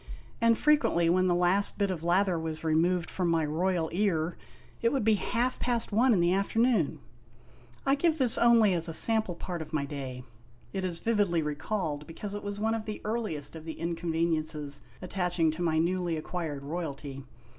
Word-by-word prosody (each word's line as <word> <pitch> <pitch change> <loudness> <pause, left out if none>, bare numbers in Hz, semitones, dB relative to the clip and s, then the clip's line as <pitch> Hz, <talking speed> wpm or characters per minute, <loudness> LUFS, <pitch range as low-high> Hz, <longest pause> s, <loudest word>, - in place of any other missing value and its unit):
and 230 0 +4
fre 300 - +3
quently 170 - +3
when 185 +1 +3
the 175 - +2
last 180 +3 +4
bit 200 -2 +1
of 175 -4 -4
lather 180 0 +2
was 160 -1 -5
removed 165 +2 +1
from 180 -2 -1
my 165 -2 +2
royal 170 +2 0
ear, 175 -4 0 0.5
it 230 - +2
would 270 -5 0
be 220 +1 +4
half 240 +4 -1
past 240 -2 0
one 240 +5 +4
in 205 - +3
the 175 +1 +3
afternoon! 210 - +1 0.9
I 270 - +3
give 315 +3 +2
this 255 -5 +3
only 230 -4 +5
as 170 -1 -1
a - - -2
sample 220 0 +2
part 175 0 -5
of 155 0 -9
my 145 -2 0
day. 135 -3 -6 0.5
It 190 -1 -2
is 180 -2 -2
vividly 200 -5 +1
recalled 150 0 -3
because 195 +5 -6
it 205 - -4
was 205 0 -5
one 220 +1 +1
of 225 -1 -3
the 215 - -5
earliest 210 -11 -3
of 160 - -8
the 160 -1 -7
inconveniences 165 -3 -1 0.2
attaching 175 -3 0
to 160 +3 -6
my 160 -2 +1
newly 175 0 0
acquired 155 -3 -4
royalty. 140 -3 -5
175 Hz, 190 wpm, -29 LUFS, 160-210 Hz, 0.9 s, only